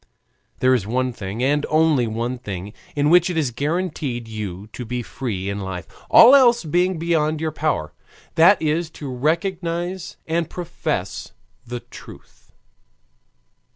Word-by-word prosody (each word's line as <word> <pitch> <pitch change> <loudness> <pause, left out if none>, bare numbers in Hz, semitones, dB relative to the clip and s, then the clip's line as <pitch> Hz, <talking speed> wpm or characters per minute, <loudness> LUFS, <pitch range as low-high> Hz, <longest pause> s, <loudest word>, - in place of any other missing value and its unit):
There 130 0 +5
is 110 -6 0
one 125 +2 0
thing, 105 +2 -5
and 145 +2 +2
only 155 -6 +3
one 120 +3 -3
thing, 100 -3 -6 0.2
in 145 +1 +2
which 180 +1 +5
it 175 - -2
is 145 -6 +1
granted 155 +7 -1
to 150 - -3 0.2
you 100 -3 -5
to 125 - -6
be 125 +1 -4
free 105 -7 -4
in 100 0 -3
life, 95 -2 -5 0.2
all 240 +4 +9
else 240 -5 +6
being 175 +3 +1
beyond 160 -2 0
your 160 0 -1
power: 145 - -2 0.4
that 170 +5 +6
is 160 +2 0
to 140 -4 -6
recognize 170 +4 -2
and 165 0 -1
profess 175 -1 -4 0.3
the 120 0 -5
truth. - - -15
150 Hz, 150 wpm, -22 LUFS, 120-170 Hz, 0.4 s, all